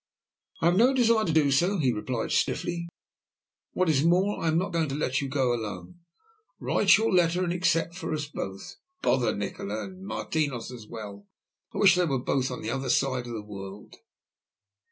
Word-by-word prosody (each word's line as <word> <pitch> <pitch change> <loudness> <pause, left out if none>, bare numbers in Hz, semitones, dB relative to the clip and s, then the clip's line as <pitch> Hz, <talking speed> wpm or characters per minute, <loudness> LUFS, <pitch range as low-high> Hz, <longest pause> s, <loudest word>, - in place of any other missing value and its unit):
"I - - +1
have 175 +2 +4
no 250 +5 +5
desire 230 -3 +3
to 165 - 0
do 155 -3 +3
so," 175 +9 +2
he 130 -7 +2
replied 115 +2 -3
stiffly. 170 -1 -1 0.8
"What 185 - +1
is 150 -3 +3
more, 185 +5 +2
I - - -1
am 160 0 +2
not 185 +1 -1
going 165 -3 0
to 135 - -3
let 135 -2 0
you 140 - -3
go 130 -3 +1
alone. 105 - -6 0.6
Write - - +4
your 225 +1 +1
letter 175 0 +3
and 175 -1 -1
accept 170 -2 +1
for 180 - -5
us 155 -1 -2
both. 95 -9 -7 0.3
Bother 125 -2 +2
Nikola 100 +1 -4
and 190 0 -10
Martinos 145 - -2
as 115 -4 -10
well, 105 -3 -9 0.4
I - - -7
wish 195 -3 +6
they 180 -1 +2
were 135 -5 0
both 130 +1 0
on 125 - -6
the 110 - -2
other 135 0 -3
side 130 -1 +1
of 120 - -6
the 110 -2 -5
world." 100 -1 -9
145 Hz, 195 wpm, -27 LUFS, 120-175 Hz, 0.8 s, wish